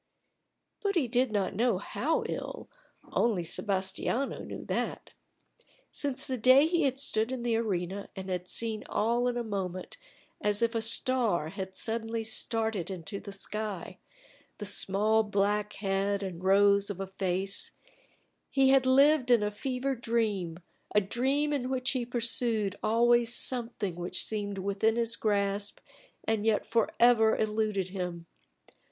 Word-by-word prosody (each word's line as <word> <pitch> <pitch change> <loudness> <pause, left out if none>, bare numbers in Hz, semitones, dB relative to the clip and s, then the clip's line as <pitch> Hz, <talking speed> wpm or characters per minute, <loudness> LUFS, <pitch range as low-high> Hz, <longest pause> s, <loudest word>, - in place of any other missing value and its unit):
But 400 -1 0
he 305 -8 +2
did 245 +1 +1
not 200 -2 0
know 230 0 +1
how 285 - -1
ill; - - -5 0.5
only 215 -7 +1
Sebas 190 +2 -1
tiano 270 +4 -2
knew - - -7
that. - - -3 0.8
Since 280 -3 -2
the 255 -2 -3
day 255 +5 +6
he 340 +1 +1
had 265 -1 0
stood 225 -4 -1
in 255 -2 -4
the 235 -1 +1
arena 195 -3 -2
and 190 -1 -6
had 180 -1 -3
seen 220 +2 -1
all 235 +3 +1
in 245 -1 -1
a 240 - -1
moment, 190 -4 -4 0.4
as 210 +2 +2
if 230 0 +1
a 225 - 0
star 225 -7 +1
had 190 0 -6
suddenly 225 +1 -3
started 220 -4 -3
into 190 +2 -6
the 200 - -9
sky, 205 -1 -5 0.6
the 210 - -6
small 205 +2 +3
black 205 0 0
head 200 0 -1
and 180 -2 -6
rose 200 +1 +4
of 200 -2 -5
a 195 - -2
face, 190 0 +1 0.8
he 270 -1 +3
had 265 -1 +4
lived 275 0 +5
in 235 -4 +5
a 210 - -1
fevered 255 +3 -3
dream 210 -8 -1 0.4
a - - +8
dream 265 +9 0
in 255 -3 -2
which 260 0 0
he 250 -3 -2
pursued 230 -4 +1
always 240 +1 +3
something 230 -7 0
which 175 +1 0
seemed 205 -2 -3
within 200 +3 +1
his 235 0 +1
grasp 200 -1 0 0.5
and 220 -2 0
yet 220 -1 +1
forever 230 0 +3
eluded 215 -3 -1
him. 180 -3 -5
220 Hz, 150 wpm, -29 LUFS, 195-240 Hz, 0.8 s, a